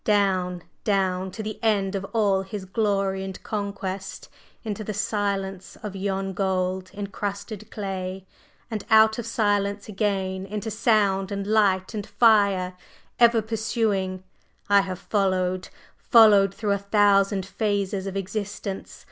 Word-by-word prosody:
down, 185 -4 +1 0.2
down 190 -2 +1
to 215 +4 -6
the 215 0 -5
end 200 -3 +2
of 195 -1 -2
all 200 -3 +1
his 190 0 -6
glory 195 -1 0
and 190 -1 -7
conquest 200 -2 -4 0.4
into 215 -1 -4
the 215 - -4
silence 200 -2 -2
of 205 -2 -5
yon 195 0 -2
gold 185 -1 -1
encrusted 205 +1 -5
clay! 190 -2 -5 0.5
And 215 -3 -3
out 220 0 +6
of 230 - -4
silence 205 -2 0
again 195 -2 -1
into 215 +2 -4
sound 205 -4 +2
and 200 0 -3
light 200 -3 +2
and 210 -2 -4
fire, 200 -5 +3 0.5
ever 235 -2 +5
pursuing, 210 -4 -1 0.5
I 200 0 +6
have 185 -2 -4
followed 185 -2 0 0.3
followed 210 -5 +6
through 210 -2 -1
a 200 - +1
thousand 200 -1 +3
phases 200 -1 -1
of 195 0 -4
existence! 200 0 -5
200 Hz, 130 wpm, -25 LUFS, 190-210 Hz, 0.5 s, out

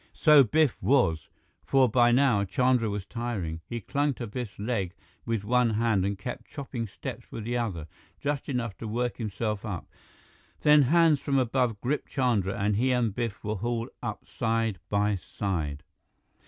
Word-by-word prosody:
So 150 -3 +7
Biff 150 +4 +2
was, 120 - +2 0.3
for 135 -1 +4
by 120 +1 +4
now 125 -5 +4
Chandra 125 +3 +2
was 100 -2 -4
tiring. 100 -10 -4
He 120 - -4
clung 145 +6 0
to 120 - -5
Biff's 115 -1 -6
leg 100 -4 -2 0.3
with 115 -3 -1
one 125 +2 +3
hand 110 -4 +2
and 100 +1 -1
kept 120 +6 -6
chopping 130 -5 -5
steps - - -8
with 110 - -6
the 120 +3 -2
other, 95 -10 -3 0.3
just 145 0 -2
enough 120 -6 -2
to 115 - -5
work 120 +3 -2
himself 105 -2 -3
up. 100 -6 -4 0.8
Then 150 0 +6
hands 160 +2 +4
from 140 -1 0
above 125 -3 +1
gripped 140 +5 -2
Chandra, 115 -8 +1
and 100 0 +1
he 130 +3 +2
and 120 -4 +1
Biff 115 -2 -4
were 105 0 -2
hauled 115 +3 -2
up - - -5
side 115 -4 -1
by 105 0 +1
side. 80 -6 -3
115 Hz, 170 wpm, -28 LUFS, 100-125 Hz, 0.8 s, So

